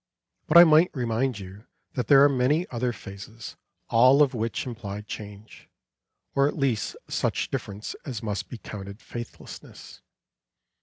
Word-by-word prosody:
But 155 - +6
I 170 - +12
might 160 +1 +5
remind 120 0 -1
you 100 +2 -11 0.3
that 125 -4 -2
there 140 +1 +7
are - - +8
many 140 +5 +1
other 125 0 -1
phases, 110 +1 -10 0.4
all 130 +5 +6
of 140 -2 0
which 115 -1 -2
imply 105 -5 -6
change, 105 0 -10 0.6
or 140 0 +3
at 150 - -4
least 135 -7 0
such - - -1
difference 100 +2 -5
as 125 -6 -6
must 100 -4 -3
be 120 - -7
counted 100 -1 -9
faithlessness. 120 -1 -10
120 Hz, 145 wpm, -26 LUFS, 105-135 Hz, 0.6 s, I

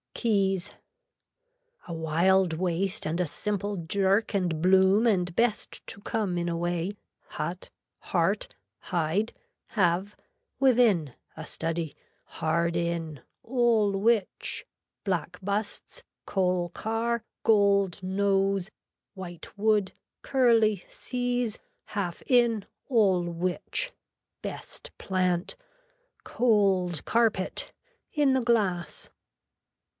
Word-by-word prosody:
KEYS 195 -5 +1 1.2
A 170 - -5
wild 170 +3 +2
waist 185 +4 -1
and 165 +3 -1
a 180 - +2
simple 205 +5 -2
jerk 195 +5 +1
and 175 -5 0
bloom 190 +5 +5
and 180 -5 +1
best 230 -3 0
to - - -6
come 200 -4 -1
in 170 0 -1
a 170 - -1
way, 175 +3 -1 0.3
hut, 170 +4 -5 0.3
heart, - - 0 0.3
hide, 180 +5 0 0.4
have, 190 0 +1 0.4
within, 230 - +4 0.2
a 160 - -7
study, 165 -2 -2 0.3
hard 170 +1 -1
in, 170 -4 -2 0.2
all 235 -4 +2
which, 210 - 0 0.4
black 180 -2 -2
busts, 205 +2 -3 0.2
coal 180 -2 +1
car, 225 +4 -1 0.2
gold 200 -4 +3
nose, 195 0 +1 0.5
white 175 -3 -9
wood, 210 -2 +2 0.3
curly 225 -7 +3
seize, 245 -3 -2 0.3
half 185 -5 -3
in, 235 -5 +3 0.2
all 200 -8 +4
which, 175 - -2 0.5
best - - -6
plant, 185 -2 0 0.7
cold 195 - +2
carpet, 225 -5 +1 0.4
in 290 -3 +3
the 260 - +2
glass. 190 -9 0
195 Hz, 100 wpm, -28 LUFS, 175-220 Hz, 1.2 s, bloom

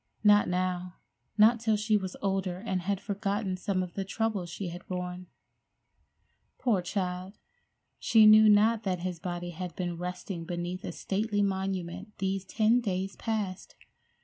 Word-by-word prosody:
Not 205 -1 +6
now—not 185 +5 0
till 220 -1 +1
she 215 +1 +1
was 190 -3 -2
older 190 -2 0
and 190 -2 -2
had 195 +1 -1
forgotten 200 -1 -2
some 185 0 -1
of 175 -2 -8
the 195 - -2
troubles 200 -2 -2
she 185 +1 -5
had 175 +1 -8
borne. 180 0 -5 1.3
Poor 225 -7 +1
child! 185 +1 -3 0.6
She 220 -2 +5
knew 215 0 +8
not 215 +2 +5
that 185 -4 -2
his 180 -2 -3
body 175 0 -4
had 180 +1 -6
been 175 -2 -3
resting 180 0 -5
beneath 175 +2 -4
a - - -4
stately 205 +1 -1
monument 190 0 -3
these 195 0 -1
ten 220 +5 +3
days 195 -3 -2
past! 210 -4 -3
190 Hz, 145 wpm, -29 LUFS, 180-210 Hz, 1.3 s, knew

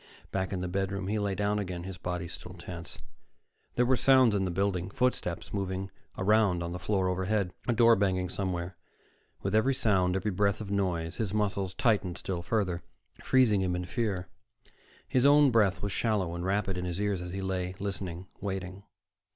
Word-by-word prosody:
Back 95 0 -1
in 95 -2 -2
the 90 - -2
bedroom, 95 +1 -2
he 105 +1 0
lay 100 -2 -1
down 105 +2 0
again, 90 -3 -4
his 95 -1 -7
body 90 0 -3
still 90 +1 -9
tense. 85 -1 -7 0.8
There 125 - +3
were 130 +1 +4
sounds 130 -3 +5
in 100 -2 +1
the - - -1
building, 95 0 0
footsteps 100 -6 -1
moving 95 -1 -3 0.3
around 100 -3 +3
on 85 - -4
the 90 - -4
floor 95 0 0
overhead, 95 +1 0
a 120 - +3
door 115 0 +6
banging 95 -2 +1
somewhere. 90 -2 -3 0.7
With 95 - -1
every 130 +5 +3
sound, 95 -7 +2
every 105 +2 0
breath 100 +2 +1
of 105 -3 -6
noise, 90 -5 -1
his 105 -3 -2
muscles 100 -3 0
tightened 100 -7 +1
still 90 -3 -3
further, 90 -2 -1 0.4
freezing 120 -7 +4
him 90 -1 0
in 90 0 -3
fear. 95 -3 -2 0.8
His 125 - +2
own 145 -1 +6
breath 105 -5 +3
was 100 - -1
shallow 100 -6 0
and 85 0 -4
rapid 95 0 0
in 90 - -3
his 90 +1 -3
ears 100 -3 0
as 90 - -5
he 95 +1 -4
lay, 90 -1 -2
listening, 95 -3 -4
waiting. 95 -1 -4
95 Hz, 185 wpm, -30 LUFS, 90-105 Hz, 0.8 s, door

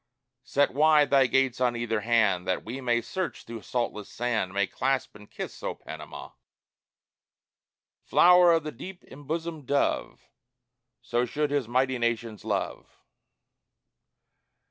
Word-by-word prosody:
Set 140 +1 +1
wide 150 -1 +4
thy 135 -2 +5
gates 130 -1 +1
on 125 -1 +2
either 115 -2 -1
hand, 110 -5 +2
That 95 - -1
we 125 +4 -6
may 120 -2 +1
search 185 +9 -4
through 115 -1 -8
saltless 115 -4 -3
sand 110 -6 -1
May 100 +1 +1
clasp 130 +5 -1
and 105 0 -14
kiss, - - -7
O - - -3
Panama!" - - -9 1.7
(Flower 180 0 +6
of 165 -1 +1
the 150 - -5
deep 180 +9 -10
embosomed 155 +1 -6
dove, 140 0 -1 0.8
So 120 +1 0
should 150 -1 -1
his 140 -5 0
mighty 130 +1 +1
nations 115 -3 -2
love.) - - -4
125 Hz, 130 wpm, -27 LUFS, 115-145 Hz, 1.7 s, Flower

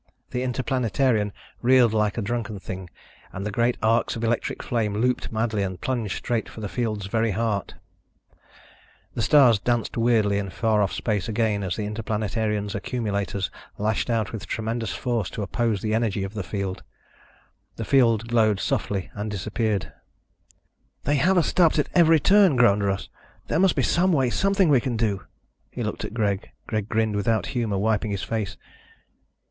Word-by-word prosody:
The 125 - -2
Interplanetarian 125 -3 0 0.3
reeled 125 -2 +5
like 105 -1 +1
a 115 - -1
drunken 115 -1 -3
thing 95 -1 -7 0.4
and 100 +2 -6
the 105 - -2
great 120 +3 +1
arcs 115 +1 +2
of 115 - -5
electric 115 0 -1
flame 110 -4 -1
looped 125 +4 0
madly 110 -1 0
and 95 -2 -3
plunged 120 -6 -2
straight 120 -2 -2
for - - -10
the 105 - -3
field's 110 -3 -2
very 110 +3 0
heart. 110 -1 -1 1.4
The - - -2
stars 120 -2 +5
danced 120 +1 -1
weirdly 110 -4 +3
in 100 -1 -4
far 110 +3 +1
off 100 - +1
space 105 -2 -2
again 110 -2 0
as 95 -2 -2
the 105 - -3
Interplanetarian's 105 -1 -2
accumulators 100 -3 -2 0.3
lashed 105 +2 -1
out 115 -3 0
with 100 -7 -6
tremendous 115 +2 -2
force 120 -6 -2
to 105 - -4
oppose 110 0 -1
the 110 -1 0
energy 110 -3 0
of 95 +1 -5
the 105 - -3
field. 95 0 -4 0.9
The - - -5
field 115 -5 +3
glowed 110 -4 +3
softly 100 -1 -2
and 105 +1 -4
disappeared. 105 +1 -2 1.1
"They 145 +1 +1
have 180 +7 +3
us 170 - +4
stopped 170 -4 +3
at 150 - +1
every 165 -2 +6
turn," 195 -1 +5
groaned 105 -5 +4
Russ. 100 0 -1 0.4
"There 160 - +1
must 190 -2 +4
be - - +1
some 185 +2 +2
way, 135 -6 +2
something 195 - +2
we 135 -4 +5
can 120 -2 -2
do." 105 -4 -1 0.4
He - - -5
looked - - -4
at 110 - -6
Greg. 100 -3 -1 0.2
Greg 110 -1 -3
grinned 110 -2 +1
without 105 -1 +1
humor, 115 -6 -1
wiping 110 +1 +1
his 100 -2 -3
face. 105 -4 -3
110 Hz, 170 wpm, -24 LUFS, 105-120 Hz, 1.4 s, every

